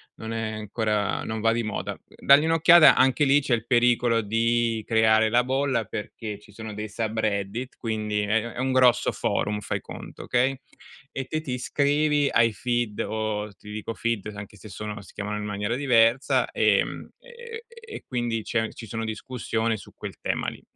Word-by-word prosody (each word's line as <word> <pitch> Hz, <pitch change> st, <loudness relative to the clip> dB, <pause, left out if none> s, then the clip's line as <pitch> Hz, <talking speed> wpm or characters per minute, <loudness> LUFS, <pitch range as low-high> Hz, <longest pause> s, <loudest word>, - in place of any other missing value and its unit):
non 110 Hz, 0 st, -6 dB
è 115 Hz, -1 st, -2 dB
ancora 105 Hz, -1 st, -1 dB
non 110 Hz, 0 st, -4 dB
va 115 Hz, +1 st, +2 dB
di 120 Hz, 0 st, -1 dB
moda. 110 Hz, -1 st, -4 dB
Dagli 140 Hz, +2 st, +4 dB
un'occhiata, 165 Hz, +1 st, +7 dB
anche 130 Hz, +3 st, +4 dB
lì 140 Hz, +1 st, +5 dB
c'è 135 Hz, -3 st, 0 dB
il 115 Hz, -1 st, 0 dB
pericolo 120 Hz, -1 st, +3 dB
di 115 Hz, +1 st, 0 dB
creare 110 Hz, -1 st, +4 dB
la 120 Hz, +2 st, +3 dB
bolla 130 Hz, -3 st, 0 dB
perché 105 Hz, 0 st, -6 dB
ci 105 Hz, -, -18 dB
sono 110 Hz, +1 st, -8 dB
dei 105 Hz, +1 st, -5 dB
subreddit 110 Hz, +2 st, -2 dB
quindi 110 Hz, -2 st, -2 dB
è 105 Hz, -, -2 dB
è 115 Hz, -, -6 dB
è -, -, -10 dB
un 130 Hz, 0 st, 0 dB
grosso 125 Hz, -2 st, +4 dB
forum, 105 Hz, 0 st, -1 dB
fai -, -, -3 dB
conto, -, -, -10 dB
okay, 130 Hz, +2 st, +1 dB, 0.5 s
e 135 Hz, -, -4 dB
te 155 Hz, +4 st, -3 dB
ti 135 Hz, -5 st, -4 dB
iscrivi 145 Hz, +3 st, +1 dB
ai 115 Hz, 0 st, +3 dB
feed 120 Hz, -1 st, -2 dB
o 105 Hz, -1 st, -3 dB
ti 105 Hz, +1 st, -13 dB
dico 110 Hz, +1 st, -5 dB
feed 115 Hz, -2 st, -2 dB
anche 105 Hz, 0 st, -9 dB
se 110 Hz, -, -12 dB
sono 105 Hz, +1 st, -6 dB
si -, -, -16 dB
chiamano 105 Hz, +1 st, -4 dB
in 105 Hz, -, -4 dB
maniera 105 Hz, +2 st, -2 dB
diversa, 125 Hz, -1 st, +3 dB
ehm, -, -, +1 dB
e 475 Hz, -2 st, -10 dB
e 465 Hz, -1 st, -14 dB
e -, -, -8 dB
quindi 120 Hz, -3 st, -2 dB
c'è 110 Hz, 0 st, -1 dB
ci 115 Hz, -, -10 dB
sono 115 Hz, +2 st, -4 dB
discussioni 110 Hz, 0 st, -2 dB
su -, -, -14 dB
quel -, -, -8 dB
tema -, -, -2 dB
lì. -, -, -12 dB
115 Hz, 185 wpm, -25 LUFS, 110-130 Hz, 0.5 s, un'occhiata